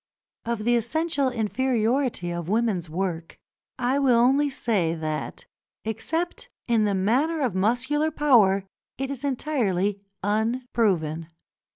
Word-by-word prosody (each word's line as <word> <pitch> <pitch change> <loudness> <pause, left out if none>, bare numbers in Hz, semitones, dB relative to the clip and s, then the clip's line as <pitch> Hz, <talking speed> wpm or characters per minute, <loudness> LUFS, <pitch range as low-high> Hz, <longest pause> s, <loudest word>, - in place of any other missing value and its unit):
Of 230 -2 -2
the 240 0 +4
essential 280 +4 +1
inferiority 240 -3 0
of 170 0 -4
women's 210 -6 0
work, 170 -1 -3 0.4
I 255 +2 +1
will 260 -4 +4
only 270 +5 +4
say 200 -11 0
that, 155 -1 -4 0.4
except 320 +11 -3 0.2
in 230 -3 +3
the 200 -1 +1
matter 260 - +1
of 255 -8 0
muscular 250 +10 +1
power, 225 -11 +4 0.3
it 270 +1 -3
is 275 -1 -4
entirely 210 -9 0 0.2
unproven. 210 -7 0
230 Hz, 115 wpm, -25 LUFS, 195-265 Hz, 0.4 s, the